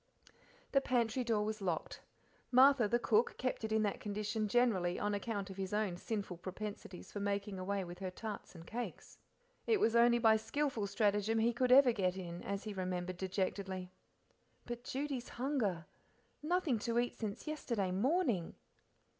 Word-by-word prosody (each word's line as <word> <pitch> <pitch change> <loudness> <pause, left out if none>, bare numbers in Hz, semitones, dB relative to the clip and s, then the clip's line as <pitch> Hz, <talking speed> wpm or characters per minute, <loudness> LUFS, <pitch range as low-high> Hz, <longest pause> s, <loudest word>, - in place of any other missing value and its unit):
The 275 - +4
pantry 245 -1 +1
door 220 -3 +1
was 215 0 -3
locked. 175 -4 -2 0.5
Martha, 260 -2 +6
the 235 - +2
cook, 230 -1 +2
kept 255 -2 -2
it 220 - -2
in 220 0 +3
that 205 - -1
condition 210 +1 -2
generally 200 -7 +2
on 205 0 0
account 205 -2 -3
of 190 - -10
his 190 0 -3
own 210 -4 0
sinful 200 -2 -4
propensities 190 +1 -7
for 205 - -4
making 200 -1 -2
away 195 +1 -1
with 175 0 -8
her 190 -1 -3
tarts 210 +1 -7
and 165 -1 -10
cakes; 240 +4 -6 0.5
it 445 -3 +4
was 230 -7 +3
only 235 0 +6
by 225 -2 +5
skilful 265 -2 -1
stratagem 210 +1 +1
he 230 +2 +3
could 250 +1 +1
ever 260 -1 +8
get 190 -4 0
in, 175 -2 -6
as 200 0 -3
he 215 - -5
remembered 185 -1 -3
dejectedly. 190 0 -2 0.7
But 240 0 -6
Judy's 270 -2 -3
hunger! 235 - -1 0.6
Nothing 310 -6 +1
to 235 +1 -1
eat 240 0 +1
since 210 -3 -4
yesterday 235 -11 -2
morning! 235 - +1
215 Hz, 165 wpm, -35 LUFS, 190-240 Hz, 0.7 s, ever